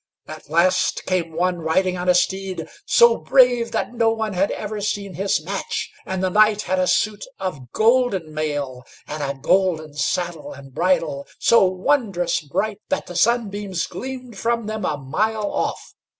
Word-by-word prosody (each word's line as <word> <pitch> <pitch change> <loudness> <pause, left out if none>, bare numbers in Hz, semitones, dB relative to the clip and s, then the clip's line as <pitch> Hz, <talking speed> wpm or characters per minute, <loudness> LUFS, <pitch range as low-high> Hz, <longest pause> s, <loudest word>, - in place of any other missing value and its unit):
At - - -10
last 185 +3 +2
came 175 -3 -1
one 175 +2 0
riding 180 +3 +1
on 180 0 -2
a 180 - +5
steed, 190 +1 -1 0.2
so 475 0 +6
brave 245 -3 +4
that - - -2
no 230 -2 +2
one 220 -2 -2
had 190 +2 +1
ever 210 0 -4
seen 200 -1 -3
his 195 +2 0
match; 195 +3 -3 0.2
and 190 0 -2
the 185 - +1
knight 210 +1 +4
had 185 0 0
a 185 - +2
suit 210 +1 +1 0.2
of 150 -10 -5
golden 220 -8 +2
mail, 145 -5 -3 0.2
and 150 0 -5
a 140 -1 -3
golden 160 -2 +1
saddle 165 +3 -2
and 135 -1 -13
bridle, 165 -4 0
so 230 -4 +5
wondrous 185 -2 0
bright 205 +8 -2
that 285 - -1
the 180 - -9
sunbeams 205 -3 0
gleamed 255 -5 -7
from 235 -1 0
them 215 0 -3
a 150 - -1
mile 210 +10 -1
off. - - -3
185 Hz, 165 wpm, -22 LUFS, 165-215 Hz, 0.2 s, so